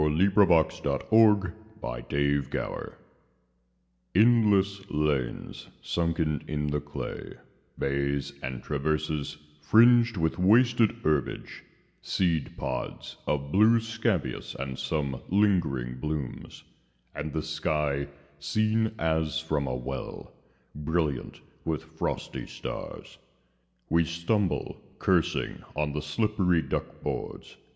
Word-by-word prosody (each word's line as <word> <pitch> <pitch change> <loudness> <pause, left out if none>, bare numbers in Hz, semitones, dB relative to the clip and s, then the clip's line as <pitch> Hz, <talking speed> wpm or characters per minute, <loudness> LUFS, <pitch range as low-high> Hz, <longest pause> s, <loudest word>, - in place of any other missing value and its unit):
Frederic 85 +2 +4
Manning 100 - +4 0.3
THE - - -5
TRENCHES 70 -1 -1 1.2
ENDLESS 100 -3 +4
lanes 75 -5 -1 0.2
sunken 80 -3 0
in 75 -1 -1
the 75 -1 0
clay, - - -6 0.4
Bays, 70 0 -1
and 65 -1 -5
traverses, 75 0 -1 0.2
fringed 115 +6 +6
with 80 +1 0
wasted 115 +4 +5
herbage, 75 -4 -1 0.4
Seed 85 -6 0
pods 65 -2 -4
of 70 -1 -1
blue 110 +5 +6
scabious, 110 - -2
and 65 -1 -5
some 70 -4 -2
lingering 80 -12 +1
blooms; 75 -2 -5 0.5
And 75 +1 -4
the 80 +1 -2
sky, 75 -3 -1 0.3
seen 110 +1 +1
as 80 -3 0
from 75 -3 -1
a 65 - -1
well, 65 +1 -6 0.4
Brilliant 75 -2 -2 0.2
with 80 -1 -2
frosty 80 0 -4
stars. - - -7 0.7
We 85 0 +3
stumble, 85 +4 -1 0.2
cursing, - - +1
on 75 -1 -1
the 75 - -2
slippery 90 +1 +1
duck - - -4
boards. - - -5
80 Hz, 100 wpm, -28 LUFS, 70-100 Hz, 1.2 s, fringed